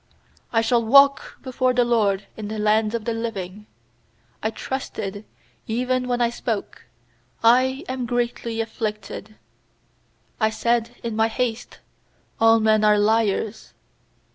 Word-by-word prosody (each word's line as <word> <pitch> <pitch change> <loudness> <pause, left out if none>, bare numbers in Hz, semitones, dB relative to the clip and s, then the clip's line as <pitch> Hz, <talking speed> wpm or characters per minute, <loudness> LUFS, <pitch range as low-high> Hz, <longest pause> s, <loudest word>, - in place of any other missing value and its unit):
9I 225 -1 +2
shall 235 0 +2
walk 275 +4 +4
before 255 -1 0
the 245 -1 +3
LORD 205 -5 +1
In 215 -1 -6
the 215 +1 -5
lands 215 +1 +2
of 225 -2 -4
the 230 - -1
living. 210 -3 -5 0.7
10I - - -2
trusted 210 -6 -5 0.4
even 250 +2 -1
when 245 -1 0
I 235 -1 +2
spoke: 225 -3 -4 0.6
'I 260 +5 +4
am 255 -2 -3
greatly 235 -1 -2
afflicted.' 215 -2 -5 1.1
UI 220 - +4
said 235 +1 0
in 230 -2 -3
my 220 0 +3
haste: 235 0 -3 0.6
'All 225 0 +5
men 215 -1 +3
are 210 0 +5
liars.' 220 0 0
225 Hz, 130 wpm, -23 LUFS, 215-240 Hz, 1.1 s, All